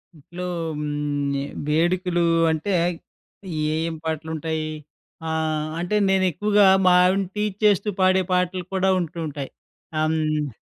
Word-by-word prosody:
ఇంట్లో 170 Hz, +4 st, -9 dB, 0.3 s
హ్మ్, 145 Hz, -1 st, -2 dB
ఈ -, -, -3 dB, 0.2 s
వేడుకలు 175 Hz, +2 st, +1 dB, 0.3 s
అంటే 160 Hz, +5 st, -2 dB, 0.9 s
ఏ, 155 Hz, -, -1 dB
ఏం 165 Hz, +1 st, -1 dB
పాటలు 160 Hz, 0 st, -3 dB
ఉంటాయి. 160 Hz, 0 st, -3 dB, 0.6 s
ఆహ్, 155 Hz, -1 st, -1 dB
అంటే 175 Hz, +4 st, -1 dB
నేను 190 Hz, -1 st, +3 dB
ఎక్కువగా 205 Hz, +4 st, +3 dB, 0.2 s
మా 180 Hz, -, +6 dB
ఆవిడని 190 Hz, +1 st, +2 dB
టీజ్ 210 Hz, -2 st, -1 dB
చేస్తూ 205 Hz, 0 st, +3 dB
పాడే 185 Hz, 0 st, +4 dB
పాటలు 180 Hz, 0 st, 0 dB
కూడా 190 Hz, 0 st, +2 dB
ఉంటూ 170 Hz, 0 st, -4 dB
ఉంటాయి. 140 Hz, -2 st, -6 dB, 0.5 s
ఆహ్, 155 Hz, -, +2 dB
హ్మ్. 155 Hz, -2 st, -1 dB
165 Hz, 135 wpm, -23 LUFS, 155-185 Hz, 0.9 s, మా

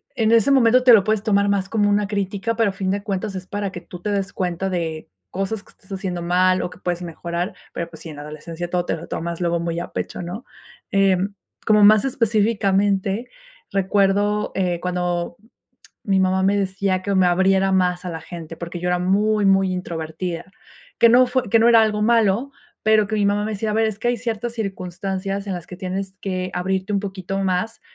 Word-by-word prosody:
en 225 Hz, -2 st, +2 dB
ese 230 Hz, +3 st, +4 dB
momento 255 Hz, -1 st, +5 dB
te 250 Hz, -2 st, +8 dB
lo 205 Hz, -4 st, +7 dB
puedes 215 Hz, -1 st, 0 dB
tomar 200 Hz, -2 st, +2 dB
más 195 Hz, -1 st, 0 dB
como 205 Hz, -1 st, +2 dB
una 205 Hz, 0 st, +2 dB
crítica, 200 Hz, +2 st, -2 dB
pero 225 Hz, -2 st, +2 dB
a 195 Hz, -, -5 dB
fin 190 Hz, -1 st, -2 dB
de 200 Hz, +1 st, -1 dB
cuentas 200 Hz, -1 st, -3 dB
es 185 Hz, 0 st, -6 dB
para 205 Hz, -1 st, -3 dB
que 175 Hz, -, -8 dB
tú 180 Hz, 0 st, -10 dB
te 210 Hz, +2 st, -2 dB
des 195 Hz, -1 st, -1 dB
cuenta 180 Hz, +1 st, -2 dB
de, 160 Hz, -, -3 dB, 0.2 s
cosas 195 Hz, +2 st, -3 dB
que -, -, -20 dB
estás 190 Hz, -, -22 dB
haciendo 185 Hz, -3 st, -3 dB
mal, 185 Hz, +1 st, +2 dB
o -, -, -3 dB
que -, -, -14 dB
puedes 175 Hz, 0 st, -3 dB
mejorar. 170 Hz, +2 st, -4 dB, 0.2 s
Pero, 170 Hz, 0 st, -4 dB
pues 160 Hz, -, -13 dB
sí, 165 Hz, -, -8 dB
en 150 Hz, -, -9 dB
la -, -, -7 dB
adolescencia 160 Hz, +3 st, -7 dB
todo 175 Hz, 0 st, 0 dB
te -, -, -1 dB
lo 160 Hz, -, -9 dB
tomas 170 Hz, +1 st, -4 dB
luego 170 Hz, -1 st, +1 dB
muy 170 Hz, 0 st, -2 dB
a 175 Hz, -, -5 dB
pecho, -, -, -4 dB
¿no? 180 Hz, +8 st, -6 dB, 0.5 s
Em, 195 Hz, 0 st, +2 dB, 0.3 s
como 210 Hz, -1 st, +5 dB
más 215 Hz, +3 st, +7 dB
específicamente, 205 Hz, -3 st, +1 dB, 0.4 s
recuerdo, 200 Hz, +2 st, +1 dB
eh, 180 Hz, -2 st, 0 dB
cuando 175 Hz, -1 st, -2 dB, 0.7 s
mi 195 Hz, -2 st, +2 dB
mamá 190 Hz, 0 st, +2 dB
me 200 Hz, +1 st, +3 dB
decía 190 Hz, -1 st, 0 dB
que 200 Hz, 0 st, -1 dB
me 185 Hz, -1 st, +4 dB
abriera 190 Hz, +2 st, +3 dB
más 180 Hz, -1 st, +1 dB
a 180 Hz, -, -3 dB
la 160 Hz, -1 st, -6 dB
gente, 165 Hz, -1 st, -8 dB
porque 170 Hz, 0 st, -6 dB
yo 180 Hz, -, -1 dB
era 180 Hz, -, +1 dB
muy, 205 Hz, +3 st, +2 dB
muy 195 Hz, -1 st, +3 dB
introvertida, 170 Hz, -1 st, -4 dB, 0.5 s
que 235 Hz, -, +7 dB
no 250 Hz, +2 st, +6 dB
fue 250 Hz, -2 st, -1 dB
que 225 Hz, +3 st, +4 dB
no 230 Hz, +1 st, +5 dB
era 230 Hz, -1 st, +7 dB
algo 210 Hz, -1 st, +1 dB
malo, 230 Hz, +2 st, +2 dB, 0.3 s
pero 215 Hz, -1 st, +4 dB
que 220 Hz, -, -3 dB
mi 205 Hz, -1 st, +1 dB
mamá 205 Hz, +1 st, +1 dB
me 220 Hz, -, -3 dB
decía: 215 Hz, +1 st, -2 dB
"A -, -, -1 dB
ver, 220 Hz, +1 st, +2 dB
es 210 Hz, -2 st, -3 dB
que 240 Hz, -, -1 dB
hay 240 Hz, -1 st, 0 dB
ciertas 230 Hz, 0 st, -3 dB
circunstancias 195 Hz, -1 st, -4 dB
en 195 Hz, -, -2 dB
las 175 Hz, -2 st, -7 dB
que 180 Hz, -, -9 dB
tienes 190 Hz, +1 st, -4 dB
que 185 Hz, -1 st, -3 dB
abrirte 190 Hz, +3 st, -2 dB
un 200 Hz, -, +1 dB
poquito 195 Hz, -1 st, -4 dB
más 195 Hz, +4 st, -1 dB
195 Hz, 220 wpm, -21 LUFS, 180-210 Hz, 0.7 s, te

